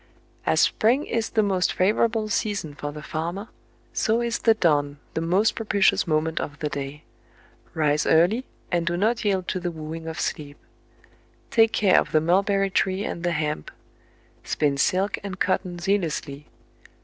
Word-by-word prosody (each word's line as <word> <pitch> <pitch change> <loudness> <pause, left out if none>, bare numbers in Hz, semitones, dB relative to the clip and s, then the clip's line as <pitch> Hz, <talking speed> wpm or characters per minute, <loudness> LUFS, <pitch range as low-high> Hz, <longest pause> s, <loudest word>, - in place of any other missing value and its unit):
"As - - +3
spring 250 +7 +2
is 230 -1 -1
the 220 - +2
most 190 -3 +1
favorable 215 +3 +1
season 200 -6 -2
for 145 0 -5
the 150 0 -9
farmer, 175 +8 -4 0.4
so 225 0 +1
is 235 -1 -1
the 225 -1 +4
dawn 145 -7 +1 0.2
the 160 - -2
most 185 +6 +2
propitious 205 -4 +2
moment 160 0 0
of 145 -1 -6
the 150 - -3
day. 145 +1 -6 0.3
" - - -31
Rise 150 -1 +1
early, 180 +10 +4 0.3
and 170 -2 0
do 175 +1 0
not 225 +5 +1
yield 190 -3 0
to 185 - -1
the 175 0 -2
wooing 160 0 -7
of 160 - -5
sleep. 145 -1 -4 0.5
" - - -34
Take 225 -1 +5
care 200 -3 +4
of - - -4
the 155 - +5
mulberry 195 +4 +2
tree 190 +2 +1
and 170 - -4
the 175 0 0
hemp. 150 - -2 0.4
" - - -34 0.3
Spin 145 -2 0
silk 185 +8 +1
and 190 -2 -6
cotton 185 -1 0
zealously. 165 -6 -2
175 Hz, 175 wpm, -24 LUFS, 155-205 Hz, 0.5 s, Take